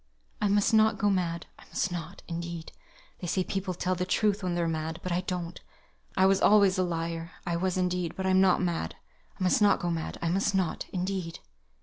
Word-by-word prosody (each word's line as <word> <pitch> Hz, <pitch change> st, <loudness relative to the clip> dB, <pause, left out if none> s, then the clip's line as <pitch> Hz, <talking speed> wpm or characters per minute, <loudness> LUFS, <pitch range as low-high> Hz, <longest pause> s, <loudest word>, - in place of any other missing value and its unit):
"I 210 Hz, -, +3 dB
must 205 Hz, +3 st, +3 dB
not 220 Hz, 0 st, +5 dB
go 205 Hz, 0 st, +2 dB
mad. 170 Hz, -3 st, -1 dB
I -, -, -15 dB
must 190 Hz, -, -2 dB
not, 175 Hz, +2 st, -6 dB
indeed. 170 Hz, -1 st, -5 dB, 0.5 s
They 180 Hz, -, -5 dB
say 185 Hz, +2 st, +1 dB
people 190 Hz, -1 st, -3 dB
tell 185 Hz, +1 st, 0 dB
the 180 Hz, 0 st, -1 dB
truth 205 Hz, +2 st, +1 dB
when 180 Hz, -2 st, -1 dB
they're 170 Hz, -1 st, +1 dB
mad; 160 Hz, 0 st, -3 dB
but 180 Hz, -, -3 dB
I 175 Hz, +1 st, +1 dB
don't. 180 Hz, -2 st, -4 dB, 0.6 s
I 190 Hz, -, +5 dB
was 195 Hz, 0 st, +4 dB
always 200 Hz, -2 st, +5 dB
a -, -, +4 dB
liar. 165 Hz, -1 st, -3 dB
I 175 Hz, -1 st, -1 dB
was, 185 Hz, +1 st, 0 dB
indeed; 180 Hz, -2 st, -1 dB
but 190 Hz, -, -3 dB
I'm 190 Hz, 0 st, +4 dB
not 185 Hz, -1 st, +4 dB
mad. 170 Hz, -, -2 dB, 0.4 s
I -, -, -1 dB
must 185 Hz, +3 st, +3 dB
not 205 Hz, -1 st, +5 dB
go 175 Hz, -, -1 dB
mad. 165 Hz, -1 st, -3 dB
I 165 Hz, -, -1 dB
must 195 Hz, +3 st, +1 dB
not, 185 Hz, -4 st, -1 dB
indeed." 185 Hz, -2 st, -3 dB
180 Hz, 215 wpm, -29 LUFS, 170-190 Hz, 0.6 s, not